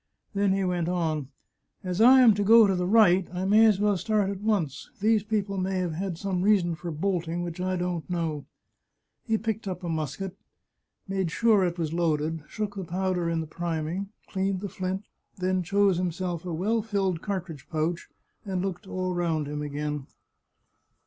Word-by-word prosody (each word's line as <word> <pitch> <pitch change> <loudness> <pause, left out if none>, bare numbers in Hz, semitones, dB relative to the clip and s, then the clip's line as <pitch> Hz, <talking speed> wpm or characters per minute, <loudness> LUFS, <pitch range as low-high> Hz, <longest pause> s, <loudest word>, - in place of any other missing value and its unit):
Then 200 -1 +2
he 195 0 0
went 175 -2 0
on: 160 -6 -1 0.3
" - - -47
As 185 +2 -1
I 260 +3 +8
am 235 -4 +7
to 205 0 0
go 225 +2 +8
to 195 - +2
the 180 0 -1
right, 190 -4 +5
I 180 +1 -3
may 215 +3 +6
as 205 -3 +3
well 205 -1 +2
start 210 0 +1
at 195 -1 -6
once. 200 -10 -1
These 215 +1 +3
people 200 -2 -2
may 190 +1 -1
have 180 -3 -1
had 180 +1 -3
some 185 -1 -2
reason 190 -4 +3
for 170 +2 -6
bolting 170 0 -1
which 175 0 -5
I 185 0 0
don't 175 -2 -3
know." 160 -5 -2 0.8
He 225 -1 +2
picked 220 -1 -3
up 185 -1 -4
a 175 - -3
musket, 160 +4 -3 0.7
made 190 -3 -1
sure 215 +1 +3
it 175 -1 -1
was 165 -2 -2
loaded, 160 -1 0
shook 210 -2 -4
the 195 - -5
powder 180 0 -1
in 165 -1 0
the - - -4
priming, 170 +3 -3 0.2
cleaned 190 -1 -1
the 200 - -4
flint, 190 +2 -3 0.3
then 185 0 0
chose 195 +1 +2
himself 175 -1 -2
a 180 - -3
well 210 +8 0
filled 195 -5 -1
cartridge 175 -9 -5
pouch 165 +2 -2 0.3
and 190 -3 -2
looked 190 -1 -4
all 185 -1 -2
round 165 -4 0
him 150 0 -4
again. 150 -1 -4
185 Hz, 190 wpm, -27 LUFS, 170-200 Hz, 0.8 s, I